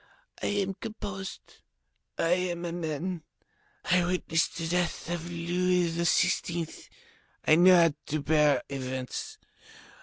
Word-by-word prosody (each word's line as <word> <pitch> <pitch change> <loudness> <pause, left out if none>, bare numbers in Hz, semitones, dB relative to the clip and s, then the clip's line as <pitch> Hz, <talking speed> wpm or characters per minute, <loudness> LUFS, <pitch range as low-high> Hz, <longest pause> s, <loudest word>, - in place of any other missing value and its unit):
I - - -1
am 200 -1 0
composed, 195 -3 -7 0.6
I 165 - +1 0.2
am 175 0 -4
a 170 - -3
man, 170 +1 -3 0.6
I 180 0 +3
witnessed 175 -2 0
the 165 -1 -2
death 175 -1 -1
of 175 0 -3
Louis 175 +1 +1
XVI., 170 0 0 0.6
I - - +6
know 180 +2 +7
how 165 -3 +5
to 155 0 -1
bear 150 -1 +3
events. 130 -2 -5
170 Hz, 120 wpm, -28 LUFS, 160-180 Hz, 0.6 s, know